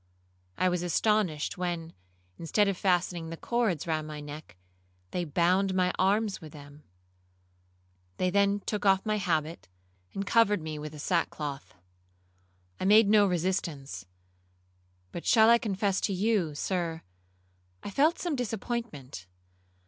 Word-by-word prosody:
I 185 - +2
was 180 -1 0
astonished, 180 -3 0
when, 170 -2 -3 0.5
instead 200 +5 +2
of 195 - 0
fastening 175 -3 0
the 165 - -6
cords 225 -9 -1
round 155 -2 -2
my 150 -1 -7
neck, 145 - -10 0.5
they 180 - -1
bound 180 +5 +2
my 180 -1 +2
arms 200 +2 +1
with 155 -2 -11
them. 145 0 -13 1.4
They 185 0 +1
then 200 +1 +2
took 210 0 -3
off 195 0 +3
my 215 -1 +1
habit, 165 - -2 0.5
and 195 - -2
covered 210 -2 +3
me 155 -1 -6
with 150 0 -7
the - - -9
sackcloth. 150 -3 -2 1.0
I - - -2
made 210 +1 +6
no 210 -1 +5
resistance; 160 - -2 1.0
but 170 - -6
shall 225 -1 +6
I 235 - +6
confess 200 -2 -1
to 200 - 0
you, 190 -5 0
Sir, 165 0 -2 0.8
I - - -6
felt 305 - +3
some 345 -4 -2
disappointment. 220 - -5
180 Hz, 135 wpm, -29 LUFS, 155-205 Hz, 1.4 s, made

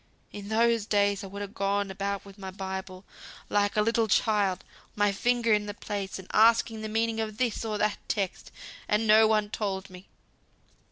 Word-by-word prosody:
In 205 0 -8
those 230 -1 +2
days 205 -2 +2
I - - -6
would 200 +1 -6
ha' 195 - -20
gone 200 0 -1
about 200 +1 -3
wi' 200 - -12
my 195 -1 -7
Bible, 190 0 -6 0.4
like 205 0 +1
a 210 - +4
little 230 0 +1
child, 205 -3 +1 0.3
my 205 -1 +2
finger 235 +2 +1
in 210 0 +1
th' 205 - -7
place, 200 -2 -4
and 190 -1 -11
asking 225 0 +4
the 215 - -4
meaning 225 +1 0
of 215 -1 -3
this 240 -3 -1
or 215 -2 -2
that 210 0 0
text, 195 -3 -3 0.4
and 210 +2 +1
no 220 +1 +6
one 215 -1 +1
told 195 -3 -3
me. 180 +1 -13
205 Hz, 185 wpm, -28 LUFS, 195-220 Hz, 0.4 s, no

